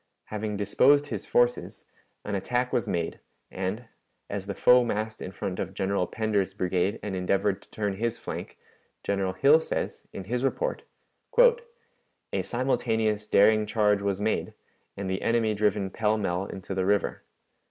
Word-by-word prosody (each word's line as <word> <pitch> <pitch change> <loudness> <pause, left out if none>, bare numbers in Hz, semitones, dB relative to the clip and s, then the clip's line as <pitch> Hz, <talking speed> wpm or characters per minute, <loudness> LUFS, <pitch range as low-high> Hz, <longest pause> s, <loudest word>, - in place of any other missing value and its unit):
Having 105 -1 -4
disposed 140 +8 +4
his 110 -8 -5
forces, 120 0 +1 0.4
an 105 - -3
attack 125 +6 -1
was 120 - +1
made, 85 -1 -2 0.3
and, 95 +6 -3 0.5
as 100 -1 -4
the 100 - -4
foe 125 0 +6
massed 110 -1 -3
in 95 - -5
front 95 -1 -4
of 95 +1 -4
General 95 -2 0
Pender's 105 -3 -1
brigade 95 +1 0
and 100 -2 -3
endeavored 95 +2 0
to - - -20
turn 105 -2 -2
his 115 +2 -1
flank, - - -7 0.5
General 95 -2 -1
Hill 140 +11 +5
says, - - -4
in 95 - -6
his 120 +6 -2
report: - - -1 1.5
"A - - +1
simultaneous 110 -4 0
daring 105 +1 +4
charge 105 -2 +2
was 100 -1 -1
made, 110 +1 -1 0.4
and 100 -1 -4
the 95 0 -2
enemy 115 -2 +2
driven 105 -2 0
pell 110 -1 +1
mell 95 -2 -1
into 95 0 -6
the 95 -1 0
river. 100 0 +1
105 Hz, 155 wpm, -27 LUFS, 95-110 Hz, 1.5 s, foe